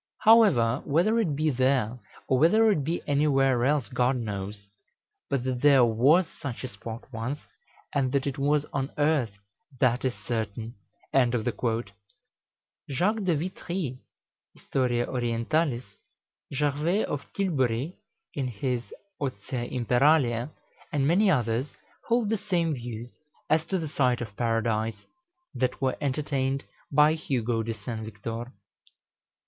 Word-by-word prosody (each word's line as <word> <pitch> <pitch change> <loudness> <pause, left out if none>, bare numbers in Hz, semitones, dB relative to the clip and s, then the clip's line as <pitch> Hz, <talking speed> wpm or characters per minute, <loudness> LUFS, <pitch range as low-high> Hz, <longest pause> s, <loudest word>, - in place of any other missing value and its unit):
However, 175 - +5
whether 180 +10 +2
it 170 -11 +1
be 155 +1 +1
there, 130 -2 +1 0.3
or 130 - +2
whether 215 +8 +5
it 155 -8 +1
be 165 +5 -2
anywhere 135 -4 +3
else, 140 -4 +2
God 125 +3 +1
knows; 100 -3 -5 0.6
but 140 -3 0
that 125 -1 -2
there 140 -4 +6
was 135 +11 +4
such 135 -7 -7
a - - -2
spot 115 +1 -8
once, 115 +6 -3 0.6
and 135 -3 +1
that 140 -1 +1
it 140 0 -3
was 145 +1 +2
on 135 -1 -1
earth, 145 -5 +2 0.5
that 125 -1 +2
is 130 -2 0
certain." 110 0 -4 0.4
Jacques 120 -3 +1 1.3
de 175 -3 +3
Vitry 170 -4 -4 0.6
("Historia 120 -2 0
Orientalis"), 125 +3 0 0.7
Gervais 150 +8 +1
of 145 -1 -5
Tilbury, 145 - 0 0.4
in 135 -3 -2
his 125 +1 -2 0.4
"Otia 125 -1 -4
Imperalia," 125 0 +3 0.4
and 140 -2 +1
many 195 +6 +4
others, 125 -3 0 0.3
hold 235 -3 +2
the 220 - +1
same 175 -6 0
views, 120 -2 -7 0.3
as 160 +1 +3
to 190 - 0
the 165 -3 -3
site 130 -4 +1
of 110 -4 -6
Paradise, 115 -2 -1 0.5
that 125 0 -1
were 130 -1 0
entertained 140 -1 -1 0.3
by 150 +2 +5
Hugo 120 -7 -1
de 115 0 -3
St. 110 +2 -6
Victor. 115 +3 -6
130 Hz, 130 wpm, -27 LUFS, 120-150 Hz, 1.3 s, there